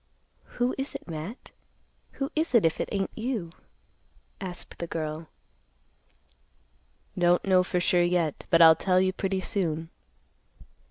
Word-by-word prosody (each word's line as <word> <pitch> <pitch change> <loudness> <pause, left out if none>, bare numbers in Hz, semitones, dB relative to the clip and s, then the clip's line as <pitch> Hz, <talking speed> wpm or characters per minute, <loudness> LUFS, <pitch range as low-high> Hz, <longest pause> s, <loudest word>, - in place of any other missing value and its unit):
"Who 245 +1 +1
is 270 - -3
it, - - -8
Matt? 165 - -7 0.6
Who 275 +2 -3
is 315 -4 0
it, 225 - +5
if 165 - +1
it - - -2
ain't 195 -2 -2
you?" 220 -8 -3 0.9
asked 180 -2 -7
the 170 - -4
girl. 155 0 -4 1.9
"Don't 175 0 +3
know 185 -2 +5
for 180 0 -1
sure 175 0 +3
yet, 175 -3 0
but 170 -1 +6
I'll 160 0 +9
tell 185 +2 +2
you 185 0 +1
pretty 190 0 -2
soon." 165 -6 -2
180 Hz, 140 wpm, -27 LUFS, 165-200 Hz, 1.9 s, I'll